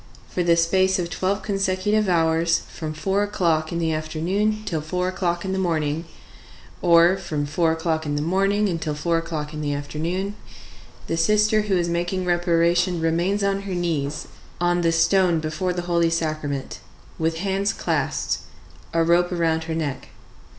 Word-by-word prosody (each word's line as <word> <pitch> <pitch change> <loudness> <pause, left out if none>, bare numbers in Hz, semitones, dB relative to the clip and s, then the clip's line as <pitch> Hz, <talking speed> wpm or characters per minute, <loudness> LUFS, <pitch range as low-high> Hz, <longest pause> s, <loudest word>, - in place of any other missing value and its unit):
For 180 - -2
the 170 -1 +4
space 185 +3 +3
of 170 -2 -3
twelve 190 +4 -1
consecutive 195 +1 0
hours, 165 -1 +2
from 155 -2 -5
four 190 +6 0
o'clock 170 -6 0
in 170 - -2
the 165 -1 0
afternoon 180 +8 -1
till 160 -4 -2
four 180 +4 -2
o'clock 175 -1 -1
in 190 - -2
the 190 - -1
morning, 160 -3 -1 0.8
or 170 +2 +5
from 155 -6 -3
four 160 +3 +1
o'clock 160 -1 -1
in 145 - -1
the 145 - -1
morning 195 +5 +2
until 165 -4 -2
four 165 +2 0
o'clock 160 -2 -5
in 155 - -5
the 145 -1 -1
afternoon, 165 +7 -3 0.7
the 165 - -2
sister 210 +5 +3
who 205 -3 0
is 175 -1 0
making 175 +2 -1
reparation 175 0 +2
remains 170 +5 +1
on 195 0 +1
her 195 -2 -4
knees 155 -5 -2 0.3
on 175 0 +2
the 165 -1 +2
stone 175 +1 +3
before 155 +4 -2
the 175 -1 -3
Holy 170 -1 +2
Sacrament, 155 -4 -3 0.4
with 160 0 0
hands 195 +2 0
clasped, - - -1 0.6
a 165 - +4
rope 175 +2 +3
around 165 -2 0
her 160 0 -3
neck. 145 -5 -3
170 Hz, 165 wpm, -23 LUFS, 160-185 Hz, 0.8 s, or